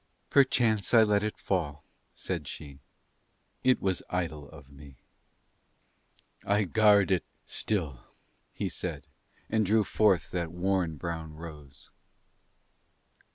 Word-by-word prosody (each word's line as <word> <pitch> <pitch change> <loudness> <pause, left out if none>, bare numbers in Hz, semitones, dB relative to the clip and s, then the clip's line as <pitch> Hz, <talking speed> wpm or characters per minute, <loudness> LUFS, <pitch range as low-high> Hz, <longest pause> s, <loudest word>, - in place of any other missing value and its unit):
"Perchance 120 -6 +3
I 115 - +8
let 105 -1 +2
it 105 0 -3
fall," 75 -6 -2 0.3
said - - -4
she. 70 -3 -9 0.8
"It 130 0 +4
was 95 -2 -1
idle 80 -5 -3
of 70 -4 -14
me." 70 -1 -14 1.5
"I 105 +1 +2
guard 100 0 +4
it 95 - +2 0.2
still," 80 - -1 0.5
he - - -3
said, 80 -6 -5 0.4
and 110 0 +1
drew 105 +2 +3
forth 100 -2 +2
that 85 -3 -2
worn 90 -2 0
brown 80 -1 -5
rose. 75 -4 -11
90 Hz, 110 wpm, -29 LUFS, 75-105 Hz, 1.5 s, I